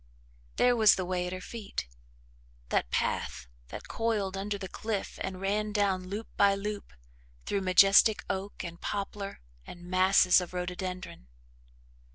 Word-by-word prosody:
There 245 0 +4
was 220 -3 +6
the 185 - -3
way 180 0 -1
at - - -5
her 185 - -5
feet 205 - -6 0.8
that - - 0
path 65 +1 -1 0.2
that - - -9
coiled 215 -4 -1
under 200 +1 -3
the 195 -1 -6
cliff 215 0 -4
and 185 -1 -4
ran 210 +2 -1
down 195 -3 0
loop 205 +4 -5
by 200 -1 +5
loop 205 - -5 0.5
through 200 - -1
majestic 195 +3 +5
oak 195 +2 -4
and 170 0 -8
poplar 200 0 -4 0.2
and 175 - -11
masses 185 0 +4
of 180 0 -7
rhododendron. 180 - -5
195 Hz, 145 wpm, -29 LUFS, 185-205 Hz, 0.8 s, was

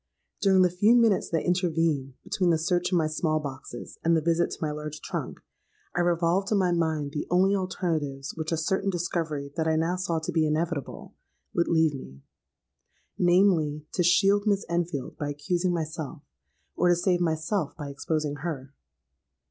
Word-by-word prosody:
During 190 -1 +5
the 180 - +3
few 205 +7 +4
minutes 230 -5 +3
that 165 - -1
intervened 165 -7 0
between 180 -2 0
the 165 - +4
search 175 +3 0
in 180 - +3
my 160 - +2
small 155 0 0
boxes 135 -4 -8
and 165 0 +4
the - - +1
visit 170 +2 +1
to - - -6
my 155 -2 -1
large 150 0 -6
trunk, - - -5 0.6
I - - 0
revolved 175 +3 +1
in 210 - +3
my 185 -2 +2
mind 160 -4 0
the 150 - -4
only 190 +3 +3
alternatives 160 -7 -2
which 160 0 -4
a 165 - +1
certain 190 +5 0
discovery 165 -5 -2
that 160 -1 0
I 160 - +2
now 165 +3 0
saw 175 -2 -1
to 160 +2 -3
be 160 -2 +2
inevitable, 155 -1 -3 0.4
would 170 - +1
leave 160 -2 +3
me: 70 - -10 1.0
namely, 175 -5 +3
to - - 0
shield 195 +4 +4
Miss 200 -1 +2
Enfield 170 -6 -2
by 145 - -3
accusing 175 +5 -1
myself; 160 -2 -4 0.5
or 180 - +3
to 175 - +5
save 175 +1 +1
myself 160 +1 -1
by 145 -3 -6
exposing 145 +1 -2
her. 140 -3 -5
165 Hz, 175 wpm, -27 LUFS, 150-180 Hz, 1.0 s, During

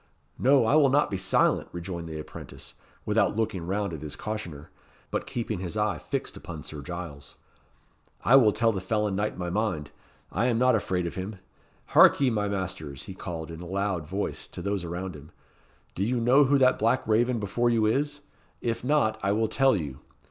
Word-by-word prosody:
"No, 135 -1 +5
I 110 - +2
will 150 -3 +6
not 145 -2 +2
be 95 - -1
silent," 95 +1 +2
rejoined 85 -1 -6
the 80 - -5
apprentice, 75 - -9 0.3
without - - +2
looking 100 -6 -2
round 100 -1 -1
at 80 - -6
his 75 -2 -6
cautioner, 85 -9 -6 0.4
but - - -2
keeping 115 -5 -3
his 95 +3 -5
eye 105 -6 0
fixed - - -4
upon - - -8
Sir 75 -2 -8
Giles. 80 -4 -7 0.9
"I 125 - +7
will 120 -6 +7
tell 115 +2 +2
the 95 -3 -3
felon 105 +1 0
knight 105 0 -1
my 90 -1 -3
mind. 90 -8 -1 0.4
I 115 +6 +1
am 120 -2 +2
not 125 +1 +4
afraid 90 -4 -1
of 85 - -3
him. 95 +3 -5 0.5
Harkye, 135 -3 +6
my 105 -2 0
masters," 85 -8 -4
he 95 - -8
called, 85 -3 -6
in 80 +1 -8
a 90 - -8
loud 95 -4 -2
voice, 100 +4 -3
to - - -8
those 100 -2 -1
around 85 +1 -5
him. 75 +1 -12 0.6
"Do 95 - -2
you 120 +3 0
know 130 +5 +5
who 140 +1 +4
that 130 -1 +4
black 115 +3 +1
raven 120 +2 +2
before 110 +4 0
you 115 -2 +2
is? 145 +6 0 0.4
If 115 -1 -2
not, 125 -6 +2
I 100 - +1
will 110 +1 +1
tell 135 +2 +3
you. 70 -6 -5
100 Hz, 195 wpm, -27 LUFS, 85-115 Hz, 0.9 s, I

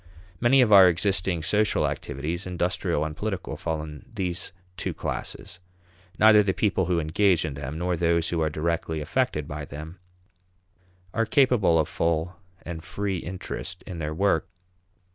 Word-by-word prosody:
Many 130 +3 +5
of 110 -4 +4
our 95 -2 +10
existing 90 -1 +1
social 105 +6 +2
activities, 80 +7 -4
industrial 90 -3 -1
and 75 -1 -5
political, 100 0 -4
fall 80 -2 -3
in 75 -1 -9
these 90 -5 -4 0.2
two - - -4
classes. - - -5 0.6
Neither 110 -1 +7
the 95 -2 0
people 95 -4 +1
who 90 -2 +1
engage 85 +2 +2
in 75 - -3
them, 70 +2 -6
nor 90 +1 0
those 85 0 +1
who 85 -2 -1
are 80 - +1
directly 80 +1 -2
affected 75 - -1
by 75 0 -5
them, 75 +5 -9 1.1
are 115 0 0
capable 125 - +4
of 80 - +2
full 85 +1 -1 0.3
and 80 -2 -7
free 100 -2 -3
interest 90 +3 -6
in 85 - -7
their 75 -1 -3
work. 90 0 +1
85 Hz, 155 wpm, -26 LUFS, 80-100 Hz, 1.1 s, our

